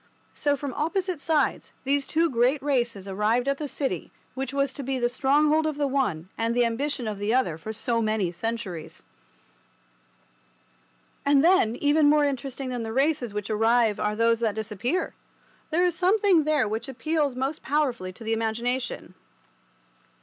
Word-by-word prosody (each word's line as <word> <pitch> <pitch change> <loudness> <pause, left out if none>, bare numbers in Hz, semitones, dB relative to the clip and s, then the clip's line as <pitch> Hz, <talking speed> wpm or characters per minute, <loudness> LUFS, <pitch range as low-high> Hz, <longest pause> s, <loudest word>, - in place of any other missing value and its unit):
So, 290 -1 +1
from 275 -2 -5
opposite 360 +2 -2
sides, 305 -4 0
those 280 0 +1
two 330 +2 +2
great 255 +1 +2
races 240 -8 -1
arrived 215 +6 +1
at 275 0 0
the 300 - -3
city 275 0 -3 0.2
which 270 +1 -4
was 275 -1 0
to 285 - -6
be 265 0 -2
the 240 -1 +1
stronghold 295 +5 +3
of 305 -2 -3
the 290 - +1
one 250 - -1
and 230 +1 0
the 245 -1 +4
ambition 245 +1 -2
of 210 -2 -4
the 210 +4 +1
other 255 -12 +1
for 165 +7 -7
so 230 +1 0
many 215 -5 0
centuries. 190 -3 -5 2.2
And 280 0 +4
then, 335 -11 +4
even 290 +2 +3
more 300 0 +4
interesting 270 -1 -3
than 245 -2 -3
the 225 -1 -4
races 270 -1 +1
which 210 +1 -4
arrive 225 0 +3
are 210 0 0
those 230 +1 +2
that 220 -3 0
disappear. 220 - -2 0.6
There 345 +3 +2
is 355 - +2
something 370 -2 +3
there 300 -6 +2
which 220 +5 -3
appeals 290 +1 -1
most 270 +4 -2
powerfully 260 -10 -1
to 185 - -12
the 225 0 -1
imagination. 235 +3 -2
255 Hz, 165 wpm, -26 LUFS, 225-290 Hz, 2.2 s, the